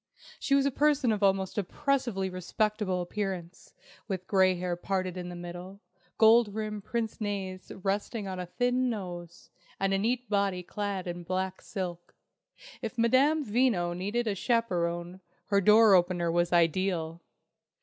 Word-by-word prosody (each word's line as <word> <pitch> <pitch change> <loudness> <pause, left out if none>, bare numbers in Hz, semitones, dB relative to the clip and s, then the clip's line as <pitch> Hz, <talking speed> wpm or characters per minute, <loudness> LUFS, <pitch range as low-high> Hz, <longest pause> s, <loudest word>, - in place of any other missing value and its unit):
She 275 - +2
was 275 0 +3
a 280 - +2
person 290 -3 +2
of 210 -1 -1
almost 195 0 +1
oppressively 240 -2 -1
respectable 185 +1 -1
appearance, 185 -2 -5 0.3
with 190 -3 -4
grey 190 -2 +3
hair 180 0 -2
parted 185 0 -2
in 180 -1 -5
the 175 - -7
middle, 175 +3 -8 0.4
gold 220 -1 +5
rimmed 210 -2 -4
pince 230 -1 -2
nez 195 -3 -4
resting 200 +2 -2
on 185 -1 -5
a 180 - -5
thin 245 +6 +1
nose, 175 -6 -7 0.3
and 195 0 +1
a 195 - +2
neat 245 +4 -1
body 200 -3 0
clad 200 0 -4
in 175 0 -5
black 185 +2 -3
silk. 175 -4 -6 0.7
If 235 0 -5
Madame 275 +6 +3
Veno 205 -7 +1
needed 205 +7 -1
a 215 - 0
chaperon, 180 -5 -1 0.3
her 200 -1 +3
door 215 +1 +7
opener 175 -2 +3
was 175 0 +1
ideal! 170 -1 +1
195 Hz, 150 wpm, -29 LUFS, 180-220 Hz, 0.7 s, door